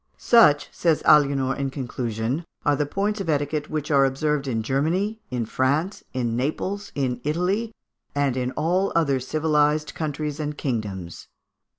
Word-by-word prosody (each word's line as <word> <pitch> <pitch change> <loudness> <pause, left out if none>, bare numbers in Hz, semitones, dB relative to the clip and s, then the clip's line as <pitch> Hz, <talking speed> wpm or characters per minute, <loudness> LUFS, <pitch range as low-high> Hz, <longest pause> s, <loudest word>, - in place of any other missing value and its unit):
"Such," 150 -12 +5
says 165 -3 +1
Aliénor, 140 -3 +4
in 140 -1 -1
conclusion, 125 +1 -3 0.2
"are 145 -1 +4
the 145 +1 -1
points 205 +5 -1
of 180 - -4
etiquette 150 0 -1
which 155 -1 -3
are 140 -1 +5
observed 140 +1 0
in 115 -4 -1
Germany, 175 - 0
in 125 -3 -2
France, 145 - 0
in 120 -3 -1
Naples, 170 +10 -2
in 125 -3 -1
Italy, 180 +9 0 0.4
and 140 -3 +1
in 125 -1 -1
all 180 +5 +1
other 140 -5 +2
civilised 150 +2 +1
countries 150 -1 -3
and 150 -1 -3
kingdoms." 100 - -4
145 Hz, 150 wpm, -24 LUFS, 130-160 Hz, 0.4 s, Such